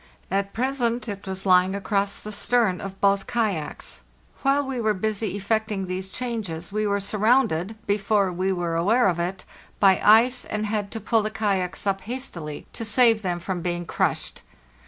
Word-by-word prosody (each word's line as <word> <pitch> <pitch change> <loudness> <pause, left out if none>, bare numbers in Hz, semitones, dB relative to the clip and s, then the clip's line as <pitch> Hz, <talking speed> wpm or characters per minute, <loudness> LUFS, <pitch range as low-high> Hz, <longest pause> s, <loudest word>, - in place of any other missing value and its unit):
At 195 +1 0
present 245 0 -1
it 200 -2 -6
was 190 0 -5
lying 185 0 +4
across 200 0 -1
the 215 - -8
stern 215 -3 +1
of 195 0 -7
both 200 -1 +2
kayaks. 205 - -2 0.4
While 275 +1 +2
we 260 -3 -3
were 215 -1 +1
busy 210 0 -2
effecting 210 0 -1
these 185 +1 -4
changes 200 -8 -4
we 215 +1 0
were 200 0 +1
surrounded, 215 -2 +1
before 200 -2 +1
we 185 +2 0
were 175 -3 -1
aware 205 +8 +3
of 175 -2 0
it, 185 +2 -3 0.3
by 190 -2 +5
ice, 235 +4 +5
and 215 0 -3
had 210 -1 -2
to 225 - -3
pull 225 +1 +2
the 215 - -2
kayaks 195 -4 -1
up 195 -1 0
hastily 190 - -6
to - - -5
save 225 0 +4
them 180 -3 -2
from 175 0 -4
being 175 0 -2
crushed. - - -1
200 Hz, 175 wpm, -24 LUFS, 185-225 Hz, 0.4 s, by